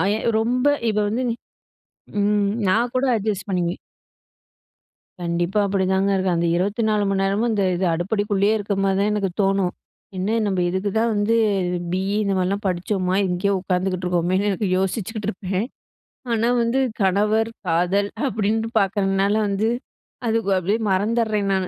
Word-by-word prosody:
ஆ -, -, +2 dB
எ -, -, -3 dB, 0.2 s
ரொம்ப 250 Hz, +4 st, 0 dB, 0.2 s
இது 210 Hz, -, -1 dB
வந்து 235 Hz, +5 st, -1 dB, 1.0 s
ம். 205 Hz, 0 st, +2 dB, 0.2 s
நான் 235 Hz, +5 st, +2 dB
கூட 260 Hz, +2 st, +2 dB
அட்ஜஸ்ட் 210 Hz, 0 st, -2 dB
பண்ணிக்குவேன். 175 Hz, -2 st, -1 dB, 1.4 s
கண்டிப்பா 175 Hz, +4 st, 0 dB
அப்டிதாங்க 190 Hz, 0 st, +1 dB
இருக்காங்க, 180 Hz, -3 st, 0 dB
24 210 Hz, +2 st, +1 dB
மணி 195 Hz, 0 st, 0 dB
நேரமும் 210 Hz, +5 st, +1 dB
இந்த 205 Hz, -2 st, +1 dB
இது, 185 Hz, -, -1 dB
அடுப்படிக்குள்ளேயே 205 Hz, +3 st, +1 dB
இருக்க 205 Hz, 0 st, -2 dB
மாரி 195 Hz, -1 st, +2 dB
தான் 205 Hz, +1 st, +2 dB
எனக்கு 200 Hz, -3 st, 0 dB
தோணும். 195 Hz, -2 st, +1 dB, 0.4 s
என்ன 205 Hz, +5 st, 0 dB
நம்ம 190 Hz, -2 st, -1 dB
இதுக்கு 190 Hz, +2 st, -1 dB
தான் 230 Hz, +1 st, +2 dB
வந்து 205 Hz, +2 st, +1 dB, 0.6 s
பி.இ 190 Hz, +2 st, -1 dB
இந்த 200 Hz, -1 st, 0 dB
மாரிலாம் 195 Hz, +3 st, -1 dB
படிச்சோமா! 185 Hz, +1 st, -1 dB
இங்கேயே 185 Hz, +3 st, 0 dB
உட்காந்துட்டு 185 Hz, 0 st, -1 dB
இருக்கோமேன்னு 180 Hz, +3 st, +1 dB
எனக்கு 195 Hz, 0 st, -1 dB
யோசிச்சுக்கிட்டுருப்பேன். 200 Hz, 0 st, -2 dB, 0.7 s
ஆனா 230 Hz, +1 st, +1 dB
வந்து 235 Hz, +3 st, +1 dB, 0.2 s
கணவர், 210 Hz, +4 st, +2 dB, 0.2 s
காதல் 180 Hz, +5 st, +1 dB, 0.2 s
அப்டின்னுட்டு 220 Hz, +1 st, -1 dB
பாக்குறதுனால 195 Hz, 0 st, +1 dB
வந்து, 200 Hz, +2 st, 0 dB, 0.6 s
அதுக்கு 220 Hz, -3 st, 0 dB
அப்டியே 200 Hz, +5 st, 0 dB
மறந்தர்றேன் 210 Hz, 0 st, +1 dB
நானு. 190 Hz, -1 st, 0 dB
200 Hz, 135 wpm, -22 LUFS, 185-215 Hz, 1.4 s, ஆ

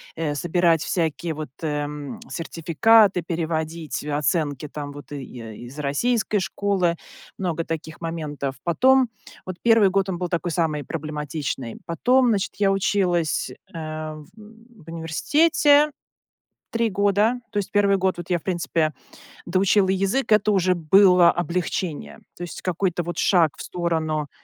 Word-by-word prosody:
э 155 Hz, -2 st, -2 dB
собирать 170 Hz, +1 st, +2 dB
всякие 165 Hz, -2 st, -2 dB
вот, 150 Hz, -4 st, -6 dB
эм, 145 Hz, -2 st, -4 dB
сертификаты, 180 Hz, +4 st, +3 dB
переводить, 165 Hz, -2 st, -3 dB
э, 150 Hz, -, -6 dB
оценки 150 Hz, -1 st, -1 dB
там 145 Hz, -1 st, -6 dB
вот, 145 Hz, 0 st, -12 dB
и 140 Hz, -2 st, -5 dB
и 115 Hz, -1 st, -9 dB
из -, -, -9 dB
из 150 Hz, -, -10 dB
российской 210 Hz, -, 0 dB
школы- 190 Hz, -2 st, 0 dB, 0.4 s
много 170 Hz, -3 st, -2 dB
таких 160 Hz, 0 st, -6 dB
моментов. 150 Hz, -5 st, -4 dB
Потом, 255 Hz, +8 st, +4 dB, 0.4 s
вот 185 Hz, -1 st, -6 dB
1 225 Hz, -4 st, +5 dB
год 195 Hz, 0 st, 0 dB
он 175 Hz, -, -2 dB
был 180 Hz, -1 st, -3 dB
такой 175 Hz, 0 st, -1 dB
самый 155 Hz, -3 st, 0 dB
проблематичный. 150 Hz, -5 st, -4 dB
Потом, 250 Hz, +10 st, +3 dB
значит, 200 Hz, -4 st, 0 dB
я 200 Hz, -1 st, +3 dB
училась, 180 Hz, -8 st, 0 dB, 0.2 s
эм, 155 Hz, -1 st, -6 dB
в 220 Hz, -3 st, -17 dB
университете 290 Hz, -, +3 dB, 0.8 s
3 230 Hz, -1 st, +1 dB
года. 205 Hz, +4 st, +2 dB
То -, -, -4 dB
есть 200 Hz, -, -2 dB
1 200 Hz, -1 st, +3 dB
год 190 Hz, 0 st, +1 dB
я, 175 Hz, -1 st, +1 dB
в -, -, -28 dB
принципе, 165 Hz, -4 st, 0 dB, 0.5 s
доучила 190 Hz, +2 st, +3 dB
язык, 195 Hz, +6 st, 0 dB
это 215 Hz, 0 st, +4 dB
уже 185 Hz, -2 st, +2 dB
было 180 Hz, +1 st, +6 dB
облегчение, 175 Hz, -1 st, -3 dB, 0.2 s
то 175 Hz, -, -6 dB
есть 170 Hz, -, -7 dB
какой-то 180 Hz, -1 st, -1 dB
вот 175 Hz, +1 st, -5 dB
шаг 170 Hz, -6 st, +3 dB
в -, -, -8 dB
сторону. 160 Hz, -4 st, -2 dB
170 Hz, 140 wpm, -23 LUFS, 155-195 Hz, 0.8 s, было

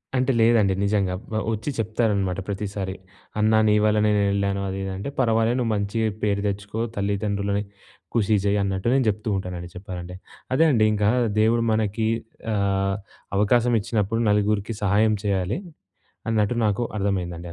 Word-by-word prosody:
అంటే 130 Hz, +1 st, +2 dB
లేదండి 110 Hz, -4 st, +4 dB
నిజంగా. 100 Hz, -3 st, +1 dB, 0.4 s
వచ్చి 110 Hz, +6 st, -4 dB
చెప్తారనమాట 105 Hz, -4 st, 0 dB
ప్రతిసారి, 100 Hz, -1 st, -4 dB, 0.4 s
"అన్నా 110 Hz, +1 st, +4 dB
నీ 105 Hz, -, +4 dB
వల్లనే 105 Hz, 0 st, +3 dB
నేనెళ్ళాను 100 Hz, -1 st, +1 dB
అది 95 Hz, -, -4 dB
ఇది 95 Hz, -, -3 dB
అంటే" 100 Hz, +8 st, -4 dB
పర్వాలేదు 115 Hz, -1 st, +2 dB
నువ్వు 115 Hz, -2 st, 0 dB
మంచిగ 100 Hz, +2 st, -1 dB, 0.2 s
పేరు 100 Hz, -1 st, +1 dB
తెచ్చుకో. 100 Hz, +2 st, -4 dB, 0.2 s
తల్లిదండ్రులని 100 Hz, 0 st, -1 dB, 0.5 s
ఖుషీ 110 Hz, -2 st, +3 dB
చేయ్యి 100 Hz, 0 st, +2 dB
అన్నట్టు 95 Hz, +2 st, -2 dB
నేను 135 Hz, -2 st, +3 dB
చెప్తూ 105 Hz, +2 st, -3 dB
ఉంటానండి 90 Hz, -2 st, -6 dB
చెప్పాలంటే. 90 Hz, -1 st, -7 dB, 0.4 s
అదే 160 Hz, +5 st, +4 dB
అండి 110 Hz, -4 st, +4 dB
ఇంకా 105 Hz, -1 st, +1 dB, 0.3 s
దేవుడు 115 Hz, +2 st, +3 dB
మనకి 110 Hz, 0 st, 0 dB, 0.5 s
ఆహ్, 100 Hz, -1 st, +1 dB, 0.4 s
అవకాశం 120 Hz, +3 st, +3 dB
ఇచ్చినప్పుడు 115 Hz, 0 st, -1 dB
నలుగురికి 105 Hz, +1 st, +1 dB
సహాయం 105 Hz, +2 st, +3 dB
చేయాలి 100 Hz, -, 0 dB, 0.7 s
అన్నట్టు 110 Hz, 0 st, +1 dB
నాకర్థమైందండి 100 Hz, -5 st, -2 dB
105 Hz, 135 wpm, -24 LUFS, 100-110 Hz, 0.7 s, లేదండి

